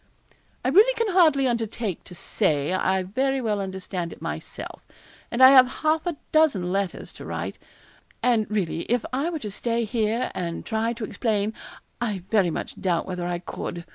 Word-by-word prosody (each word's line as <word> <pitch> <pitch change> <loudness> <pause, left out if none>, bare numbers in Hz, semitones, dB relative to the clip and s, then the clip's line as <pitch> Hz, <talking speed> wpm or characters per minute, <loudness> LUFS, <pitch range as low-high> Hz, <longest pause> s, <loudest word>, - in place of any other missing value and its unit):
'I - - +3
really 420 - +6
can 460 -2 0
hardly 310 -7 +5
undertake 225 -5 -2
to 180 - -11
say 150 -1 0
I 190 0 +1
very 265 +8 0
well 215 -5 -1
understand 190 -2 -4
it - - -11
myself, - - -6 0.5
and 240 +2 +2
I 260 - +11
have 260 -2 +8 0.2
half 315 +2 +2
a 340 -4 -2
dozen 275 - +3
letters 195 -1 -2
to - - -10
write; - - -5 0.6
and 230 -5 +2
really 200 -6 -1
if 245 0 +1
I 280 +6 0
were 340 - -3
to 215 -8 -6
stay 235 +3 -1
here 225 +1 0
and 170 -2 -4
try 225 +1 0
to 235 -1 -7
explain, 215 0 -1 0.5
I 210 -6 -2
very 200 -5 +4
much - - -5
doubt 175 -3 +1
whether 180 -2 -4
I 175 0 -1
could. 170 -1 -6
220 Hz, 175 wpm, -25 LUFS, 185-260 Hz, 0.6 s, I